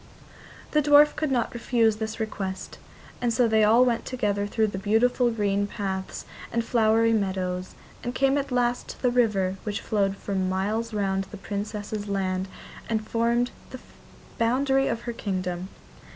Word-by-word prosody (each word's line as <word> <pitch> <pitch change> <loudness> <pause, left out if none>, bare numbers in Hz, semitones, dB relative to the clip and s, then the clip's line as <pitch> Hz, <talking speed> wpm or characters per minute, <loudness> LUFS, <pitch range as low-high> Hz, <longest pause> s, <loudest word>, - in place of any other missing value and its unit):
The 300 - +3
dwarf 295 +1 +6
could 310 -1 -1
not 250 -3 0
refuse 230 -2 +2
this 220 +1 -4
request, 195 -4 -4 0.4
and 240 -1 +1
so 235 +1 +3
they 220 -1 +3
all 230 +4 +6
went 235 -2 0
together 205 -5 -1
through 220 +1 +1
the 190 - -3
beautiful 240 +4 +2
green 205 -3 0
paths 190 -2 -4 0.3
and 235 -1 0
flowery 225 -1 +3
meadows, 185 -3 -2 0.3
and 245 +1 -4
came 270 0 +3
at 275 - -4
last 245 -1 +1
to - - -9
the 250 - +3
river 200 -6 +2
which 205 -2 -3
flowed 200 -2 0
for 200 - -5
miles 195 +5 -1
round 195 -2 0
the 200 +2 -10
Princess's 205 +1 -4
land 190 -1 -1 0.4
and 220 -1 -1
formed 235 +1 +1 0.2
the 255 - -8 0.6
boundary 270 +3 +2
of 230 0 -2
her 240 0 -4
kingdom. 185 -4 -3
220 Hz, 160 wpm, -26 LUFS, 195-240 Hz, 0.6 s, dwarf